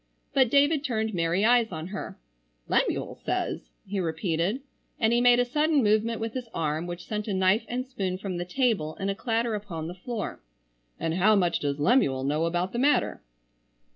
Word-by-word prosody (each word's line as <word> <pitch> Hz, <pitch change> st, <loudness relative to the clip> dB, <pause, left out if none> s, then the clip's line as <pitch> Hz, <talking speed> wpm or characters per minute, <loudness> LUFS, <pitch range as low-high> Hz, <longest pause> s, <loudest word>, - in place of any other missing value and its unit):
But 265 Hz, -4 st, +4 dB
David 285 Hz, +2 st, +3 dB
turned 220 Hz, -5 st, -1 dB
merry 170 Hz, +3 st, +1 dB
eyes 235 Hz, -1 st, +4 dB
on 160 Hz, 0 st, -5 dB
her. 195 Hz, 0 st, -6 dB, 0.5 s
"Lemuel -, -, 0 dB
says?" -, -, -2 dB, 0.2 s
he 200 Hz, 0 st, -3 dB
repeated, 175 Hz, +6 st, -1 dB, 0.4 s
and 225 Hz, -1 st, +3 dB
he 240 Hz, -, +3 dB
made 245 Hz, 0 st, +6 dB
a 245 Hz, -, +3 dB
sudden 295 Hz, +2 st, +2 dB
movement 215 Hz, +2 st, +2 dB
with 225 Hz, 0 st, -3 dB
his 250 Hz, -3 st, -5 dB
arm 160 Hz, +1 st, -1 dB
which 175 Hz, 0 st, -6 dB
sent 210 Hz, 0 st, -4 dB
a 200 Hz, -, -1 dB
knife 190 Hz, +4 st, +3 dB
and 250 Hz, +1 st, -3 dB
spoon 195 Hz, -8 st, -3 dB
from 190 Hz, -2 st, -4 dB
the 175 Hz, -, -2 dB
table 195 Hz, -, 0 dB
in 195 Hz, 0 st, -3 dB
a 195 Hz, -, -1 dB
clatter 230 Hz, +1 st, -1 dB
upon 195 Hz, -7 st, -5 dB
the 175 Hz, -, -5 dB
floor. 210 Hz, +4 st, -5 dB, 0.6 s
"And 165 Hz, 0 st, -1 dB
how 195 Hz, +5 st, +4 dB
much 180 Hz, -4 st, +2 dB
does 140 Hz, -1 st, -1 dB
Lemuel 145 Hz, -, +3 dB
know 150 Hz, +4 st, +1 dB
about 175 Hz, +2 st, -1 dB
the 240 Hz, -, -1 dB
matter?" 290 Hz, +3 st, +2 dB
210 Hz, 190 wpm, -27 LUFS, 175-240 Hz, 0.6 s, made